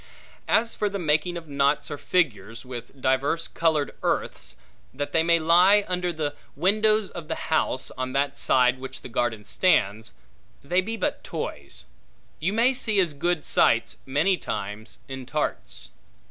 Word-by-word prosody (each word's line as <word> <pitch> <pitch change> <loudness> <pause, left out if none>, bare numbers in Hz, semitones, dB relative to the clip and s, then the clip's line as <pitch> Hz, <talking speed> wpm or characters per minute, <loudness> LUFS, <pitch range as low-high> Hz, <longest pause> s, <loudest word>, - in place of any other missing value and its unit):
As 230 +1 +2
for 210 - -1
the 200 - -3
making 165 0 +1
of 165 -2 -9
knots 140 0 +1
or 145 - -4
figures, 115 - -1
with 125 +1 -9
divers 140 +6 +1
colored 160 -3 0
earths, - - -2 0.4
that 145 +2 -4
they 165 - +4
may 170 +1 +4
lie 180 +5 +5
under 180 -1 -1
the 155 -3 -2 0.2
windows 215 +5 +2
of 170 -3 -8
the 160 - -2
house 155 -4 -1
on 130 0 -4
that 140 +1 0
side 125 0 +3
which 130 0 -8
the - - -8
garden 115 -3 -1
stands, 110 - +1 0.5
they 180 +6 +2
be 225 +4 -4
but - - -2
toys; 65 -3 -6 0.5
you 170 +5 0
may 235 +5 +3
see 220 -5 +1
as 175 -5 +2
good 175 +2 -1
sights, - - +3
many 155 +8 +2
times, 105 +3 -5
in 130 -2 -7
tarts. - - -3
155 Hz, 160 wpm, -25 LUFS, 130-180 Hz, 0.5 s, lie